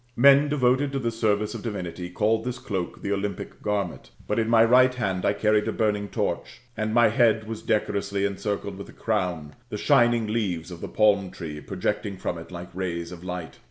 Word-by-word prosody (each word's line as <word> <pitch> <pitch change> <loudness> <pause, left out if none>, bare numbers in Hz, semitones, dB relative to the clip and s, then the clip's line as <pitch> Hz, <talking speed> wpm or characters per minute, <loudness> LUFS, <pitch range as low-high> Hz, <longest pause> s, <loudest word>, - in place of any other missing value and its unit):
Men 140 +3 +6
devoted 135 0 +2
to - - 0
the 120 -3 -1
service 105 -2 0
of - - -6
divinity 90 -5 -5
call 110 +5 +1
this 125 +1 -4
cloak 95 -7 -4
the 100 - -2
Olympic 100 0 -3
garment 100 -4 -2 0.2
But - - 0
in 110 0 0
my 115 -1 +6
right 125 +2 +6
hand 95 -7 -1
I 100 - +3
carried 105 +1 +2
a - - +1
burning 105 -2 0
torch; - - -3 0.2
and 110 0 -1
my 120 0 +5
head 110 -1 +3
was 110 -1 -5
decorously 100 -2 0
encircled 100 0 -3
with 100 - -8
a - - -13
crown, 90 -9 -2 0.2
the 105 - -4
shining 120 -2 +4
leaves 100 -6 -2
of 85 - -9
the - - -4
palm 100 -3 +3
tree 75 -4 -7
projecting 100 +5 -3
from 90 -2 -3
it 85 - -11
like 90 0 -8
rays 85 -2 -3
of 90 -1 -9
light. 90 -5 -6
105 Hz, 200 wpm, -25 LUFS, 90-115 Hz, 0.2 s, Men